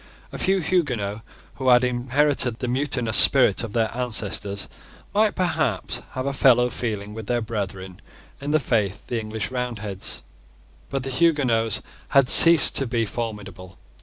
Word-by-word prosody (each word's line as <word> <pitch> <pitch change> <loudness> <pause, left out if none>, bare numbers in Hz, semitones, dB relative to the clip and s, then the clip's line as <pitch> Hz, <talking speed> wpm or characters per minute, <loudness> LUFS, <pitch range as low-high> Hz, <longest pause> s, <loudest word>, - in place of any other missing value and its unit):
A - - -8
few 190 0 0
Huguenots, 125 - -2 0.4
who 130 -1 -1
had 125 0 +5
inherited 125 0 0
the 125 - -5
mutinous 125 -3 0
spirit 125 -6 +5
of 110 -3 -7
their 115 -1 -1
ancestors, 105 -4 -3 0.5
might 210 +1 +1
perhaps 160 - -2
have 130 0 -5
a 140 - -2
fellow 125 -2 +3
feeling 105 -3 -5
with 110 -1 -9
their 120 -1 0
brethren 100 -5 -6 0.4
in 140 - -5
the 155 +1 +2
faith, 105 -7 -2
the 120 - -3
English 110 0 -6
Roundheads: 110 -6 -3 0.7
but 135 -1 -4
the 135 - -5
Huguenots 130 -8 0 0.2
had 135 -2 +2
ceased 165 -3 +8
to 135 - 0
be 115 -1 -1
formidable. 100 -5 -7
120 Hz, 150 wpm, -22 LUFS, 105-135 Hz, 0.7 s, ceased